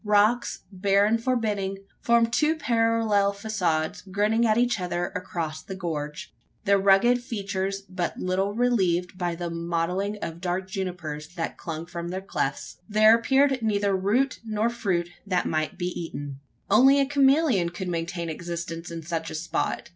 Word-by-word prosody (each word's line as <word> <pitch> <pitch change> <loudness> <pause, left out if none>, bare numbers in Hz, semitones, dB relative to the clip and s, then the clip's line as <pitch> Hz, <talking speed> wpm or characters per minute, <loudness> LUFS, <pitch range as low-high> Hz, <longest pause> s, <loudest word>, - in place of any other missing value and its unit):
Rocks, 210 +3 +2
bare 200 +1 +3
and 225 +2 +1
forbidding, 210 -6 0 0.2
formed 235 0 +3
two 310 +4 +3
parallel 225 -7 +2
facades 185 -7 -1
grinning 210 +4 +1
at 215 0 +3
each 240 -3 +2
other 175 -1 -2
across 160 -4 -4
the 190 - -7
gorge 165 +1 -5 0.3
their 200 0 +4
rugged 200 +6 +4
features 195 -4 -3
but 185 -3 -4
little 190 +2 0
relieved 190 -8 +1
by 175 -2 -2
the 170 0 -4
mottling 170 +4 -1
of 165 -2 -6
dark 185 +1 -2
junipers 180 -6 -4
that 165 -2 -3
clung 165 -1 -6
from 170 0 -6
their 185 +1 -3
clefts. 170 -7 -3
There 215 +1 +6
appeared 265 +2 +2
neither 205 -3 +1
root 220 +8 +1
nor 220 +1 0
fruit 185 -7 -1 0.2
that 185 -2 +1
might 155 -1 -1
be 175 0 -1
eaten. 145 -6 -6 0.3
Only 265 +7 +6
a 275 - +4
chameleon 275 - +3
could 180 +2 -6
maintain 170 0 -3
existence 170 0 -5
in 165 -1 -6
such 165 0 -3
a - - -6
spot! 160 +2 -2
195 Hz, 155 wpm, -26 LUFS, 170-225 Hz, 0.3 s, There